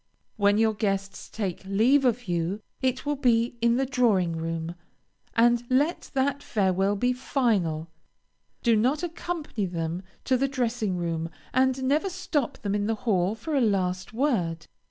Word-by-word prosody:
When 205 Hz, 0 st, +3 dB
your 220 Hz, 0 st, +3 dB
guests 195 Hz, -2 st, -2 dB
take 195 Hz, -5 st, -4 dB
leave 230 Hz, +9 st, +3 dB
of 245 Hz, -2 st, +1 dB
you, 175 Hz, +4 st, -1 dB, 0.2 s
it 260 Hz, +1 st, 0 dB
will 295 Hz, 0 st, 0 dB
be 235 Hz, -2 st, +2 dB
in 235 Hz, 0 st, +4 dB
the 270 Hz, +2 st, +1 dB
drawing 220 Hz, -10 st, +2 dB
room, 165 Hz, 0 st, -3 dB, 0.6 s
and 240 Hz, +1 st, +4 dB
let 285 Hz, +7 st, +1 dB
that 275 Hz, +1 st, +1 dB
farewell 195 Hz, -4 st, +1 dB
be 245 Hz, +5 st, +1 dB
final. 210 Hz, -, 0 dB, 0.8 s
Do 235 Hz, -2 st, +4 dB
not 255 Hz, +9 st, +1 dB
accompany 325 Hz, -, -3 dB
them 170 Hz, 0 st, -3 dB, 0.2 s
to 260 Hz, -, +2 dB
the 275 Hz, +2 st, +1 dB
dressing 235 Hz, -7 st, -1 dB
room, 165 Hz, -1 st, -2 dB, 0.2 s
and 260 Hz, 0 st, +2 dB
never 295 Hz, +8 st, +2 dB
stop 355 Hz, -8 st, -2 dB
them 200 Hz, -1 st, -1 dB
in 205 Hz, 0 st, 0 dB
the 225 Hz, -, +1 dB
hall 195 Hz, -2 st, +2 dB
for 300 Hz, +8 st, -5 dB
a 275 Hz, -, +3 dB
last 185 Hz, -4 st, 0 dB
word. 195 Hz, -, 0 dB
225 Hz, 155 wpm, -26 LUFS, 190-260 Hz, 0.8 s, in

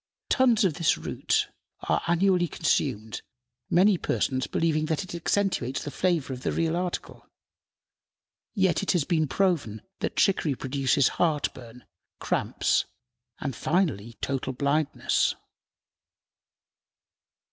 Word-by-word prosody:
Tons 240 Hz, -6 st, +4 dB
of 180 Hz, -, +2 dB
this 165 Hz, +1 st, +2 dB
root -, -, -1 dB, 0.3 s
are -, -, 0 dB
annually 175 Hz, +1 st, +3 dB
consumed, 130 Hz, -9 st, -1 dB, 0.5 s
many 185 Hz, +1 st, +4 dB
persons 130 Hz, -1 st, -1 dB
believing 155 Hz, -2 st, 0 dB
that 160 Hz, +3 st, -1 dB
it 185 Hz, -, -9 dB
accentuates 170 Hz, -6 st, -1 dB
the 145 Hz, -, -5 dB
flavor 170 Hz, -7 st, 0 dB
of 125 Hz, -, -7 dB
the -, -, -1 dB
real 165 Hz, 0 st, 0 dB
article. 180 Hz, 0 st, -4 dB, 1.3 s
Yet 190 Hz, -4 st, +2 dB
it 195 Hz, -, +1 dB
has 175 Hz, -5 st, +2 dB
been 155 Hz, -1 st, +1 dB
proven 155 Hz, -, 0 dB, 0.2 s
that -, -, -3 dB
chicory 165 Hz, -7 st, +2 dB
produces 135 Hz, +1 st, +1 dB
heartburn, 130 Hz, -7 st, -2 dB, 0.3 s
cramps, -, -, 0 dB, 0.5 s
and, 135 Hz, -4 st, -3 dB
finally, 145 Hz, -, 0 dB
total 135 Hz, -1 st, -2 dB
blindness. 140 Hz, +3 st, +1 dB
155 Hz, 115 wpm, -27 LUFS, 135-180 Hz, 1.3 s, Tons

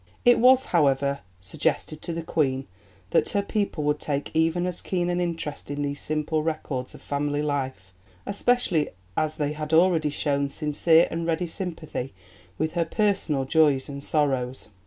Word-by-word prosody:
It 245 Hz, 0 st, +6 dB
was, 255 Hz, +2 st, +6 dB
however, 140 Hz, -3 st, +3 dB, 0.2 s
suggested 125 Hz, +10 st, -2 dB
to -, -, -5 dB
the 165 Hz, 0 st, -4 dB
Queen 135 Hz, -5 st, 0 dB, 0.5 s
that -, -, +3 dB
her 200 Hz, -1 st, 0 dB
people 200 Hz, -7 st, -1 dB
would 150 Hz, 0 st, +1 dB
take 145 Hz, -1 st, -3 dB
even 165 Hz, +2 st, +2 dB
as 180 Hz, -1 st, -3 dB
keen 175 Hz, -2 st, -1 dB
an 175 Hz, 0 st, 0 dB
interest 165 Hz, -5 st, -4 dB
in 145 Hz, 0 st, -2 dB
these 145 Hz, 0 st, -3 dB
simple 155 Hz, +1 st, -1 dB
records 150 Hz, -5 st, -3 dB
of -, -, -14 dB
family 145 Hz, +1 st, -1 dB
life, 130 Hz, -10 st, -3 dB, 0.3 s
especially 200 Hz, -7 st, +1 dB, 0.3 s
as 155 Hz, 0 st, 0 dB
they 150 Hz, -1 st, -1 dB
had 150 Hz, +1 st, -5 dB
already 165 Hz, -2 st, +4 dB
shown 140 Hz, -1 st, 0 dB
sincere 160 Hz, +3 st, +3 dB
and 165 Hz, 0 st, -2 dB
ready 165 Hz, +2 st, 0 dB
sympathy 160 Hz, -, -5 dB, 0.4 s
with 155 Hz, +1 st, 0 dB
her 170 Hz, -1 st, +1 dB
personal 165 Hz, -8 st, 0 dB
joys 145 Hz, -2 st, +3 dB
and 140 Hz, 0 st, -6 dB
sorrows. 130 Hz, -7 st, 0 dB
155 Hz, 160 wpm, -25 LUFS, 140-170 Hz, 0.5 s, It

